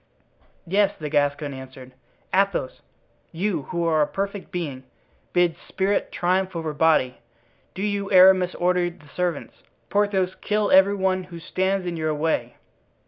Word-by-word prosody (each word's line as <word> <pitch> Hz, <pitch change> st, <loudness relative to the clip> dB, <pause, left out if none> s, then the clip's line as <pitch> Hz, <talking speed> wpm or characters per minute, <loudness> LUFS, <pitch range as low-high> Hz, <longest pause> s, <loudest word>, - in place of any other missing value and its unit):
"Yes," 195 Hz, +3 st, +1 dB
the 150 Hz, -1 st, -5 dB
Gascon 145 Hz, 0 st, 0 dB
answered; 130 Hz, -1 st, -11 dB, 0.4 s
"Athos! 195 Hz, -9 st, 0 dB, 0.5 s
you, 170 Hz, -4 st, -2 dB
who 170 Hz, -1 st, -1 dB
are 160 Hz, -2 st, +2 dB
a 150 Hz, -, +3 dB
perfect 200 Hz, 0 st, -4 dB
being, 145 Hz, -7 st, -4 dB, 0.5 s
bid 175 Hz, -2 st, +2 dB
spirit 195 Hz, +1 st, -1 dB
triumph 185 Hz, +1 st, 0 dB
over 160 Hz, -2 st, -3 dB
body. 150 Hz, -5 st, +2 dB, 0.6 s
Do 190 Hz, -, -4 dB
you, 200 Hz, -1 st, -2 dB
Aramis, 185 Hz, -1 st, +6 dB
order 180 Hz, 0 st, +1 dB
the 170 Hz, -3 st, -17 dB
servants. 175 Hz, -4 st, -3 dB, 0.3 s
Porthos, 200 Hz, -3 st, +1 dB
kill 210 Hz, 0 st, 0 dB
every 190 Hz, +2 st, +6 dB
one 190 Hz, -1 st, 0 dB
who 175 Hz, -2 st, -10 dB
stands 190 Hz, +3 st, -1 dB
in 175 Hz, -1 st, -3 dB
your 155 Hz, -1 st, -1 dB
way." 145 Hz, -6 st, -1 dB
180 Hz, 140 wpm, -24 LUFS, 155-190 Hz, 0.6 s, Aramis